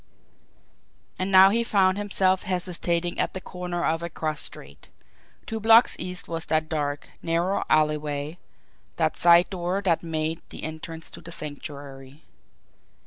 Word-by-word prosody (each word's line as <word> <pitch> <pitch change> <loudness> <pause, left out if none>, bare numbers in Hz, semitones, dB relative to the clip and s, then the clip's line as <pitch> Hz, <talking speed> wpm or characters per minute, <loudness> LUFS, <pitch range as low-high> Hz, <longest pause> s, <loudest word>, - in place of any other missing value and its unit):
And 185 +1 -1
now 190 0 +8
he 230 +2 +2
found 195 -3 +2
himself 190 -2 +1
hesitating 175 -2 -2
at - - 0
the - - -2
corner 180 -1 -4
of 165 +1 0
a 170 - -4
cross 155 -2 -3
street. - - -11 0.6
Two 225 -1 -4
blocks 225 +2 +6
east 180 +1 -4
was 165 -1 -4
that 155 0 +1
dark, 145 -2 -3
narrow 170 +4 0
alleyway, 150 +1 0 0.6
that 160 -2 +1
side 170 +2 +5
door 180 +1 -1
that 170 -4 +2
made 160 -1 -2
the - - -8
entrance 160 +1 -6
to - - -11
the 165 0 -9
Sanctuary. 145 -2 -8
170 Hz, 140 wpm, -25 LUFS, 155-185 Hz, 0.6 s, now